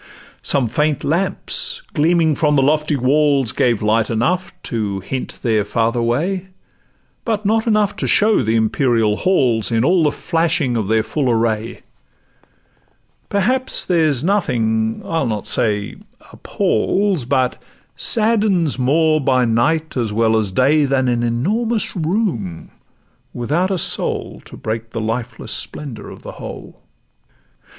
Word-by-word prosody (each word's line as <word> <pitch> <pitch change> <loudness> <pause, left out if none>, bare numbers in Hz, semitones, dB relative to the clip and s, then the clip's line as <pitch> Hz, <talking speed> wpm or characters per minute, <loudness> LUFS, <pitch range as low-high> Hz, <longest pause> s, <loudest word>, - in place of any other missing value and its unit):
Some 140 -3 +1
faint 150 +6 0
lamps 195 - -2
gleaming 160 0 +2
from 150 0 +1
the 135 - +3
lofty 150 +1 +1
walls 140 -1 +2
Gave 115 -4 +1
light 110 +1 +2
enough 170 +12 0
to 105 -4 -3
hint 130 +7 -5
their 110 -3 +2
farther 115 +3 0
way, 175 +11 -1 0.8
But 215 -2 -2
not 220 +2 +1
enough 210 -2 +2
to - - -2
show 215 -4 +3
the 110 -1 0
imperial 115 -1 +2
halls, 125 - +1
In 115 +1 +1
all 180 +3 +3
the 150 -2 +3
flashing 165 -7 0
of 110 -4 -1
their 110 +1 +2
full 135 +1 -1
array; 115 -1 -1 1.5
Perhaps 250 +6 +1
there's 155 -7 +1
nothing—I'll 125 - 0
not 105 -3 -3
say 105 -3 -1 0.4
appals, 190 -8 0
But 130 -1 0 0.3
saddens 210 - +1
more 155 +4 +2
by 130 -2 +2
night 150 +8 0
as 115 -4 -1
well 110 +1 +2
as 110 -3 +1
day, 140 +9 +3
Than 130 -2 +1
an 120 -1 0
enormous 205 - -1
room 160 - -2 0.6
without 155 +10 0
a 190 - 0
soul - - -1
To - - -11
break 110 +1 -4
the 115 - -5
lifeless 115 +2 -3
splendour 135 -7 -2
of - - -12
the - - -7
whole. - - -9
135 Hz, 135 wpm, -18 LUFS, 115-170 Hz, 1.5 s, the